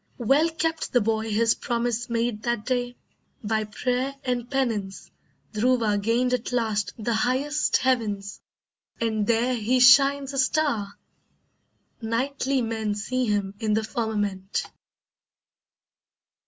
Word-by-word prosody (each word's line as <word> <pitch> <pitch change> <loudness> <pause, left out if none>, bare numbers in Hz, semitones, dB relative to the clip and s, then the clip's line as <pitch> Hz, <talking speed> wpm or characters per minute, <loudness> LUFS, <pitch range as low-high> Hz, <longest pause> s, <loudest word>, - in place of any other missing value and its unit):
Well 275 +7 +3
kept 325 0 -2
the 245 - +5
boy 220 +1 -1
his 225 +2 +3
promise 240 0 -2
made 230 -2 -1
that 235 -3 -2
day! 245 -1 -1 0.5
By 215 0 0
prayer 250 +5 -2
and 245 -2 -2
penance 225 -8 -2 0.4
Dhruva 220 -2 +1
gained 240 +4 +1
at 250 0 -2
last 220 -4 -1
The 230 +1 -2
highest 265 +6 +1
heavens, 215 -6 -1 0.6
and 220 -2 -1
there 235 +2 +2
he 245 +2 +1
shines 275 +2 +6
a 275 - -1
star! 255 -7 0 1.1
Nightly 260 +3 -1
men 220 -2 -2
see 255 +5 -1
him 200 -2 -1
in 215 -2 0
the 220 - 0
firmament. 205 -4 -2
235 Hz, 120 wpm, -25 LUFS, 215-255 Hz, 1.1 s, shines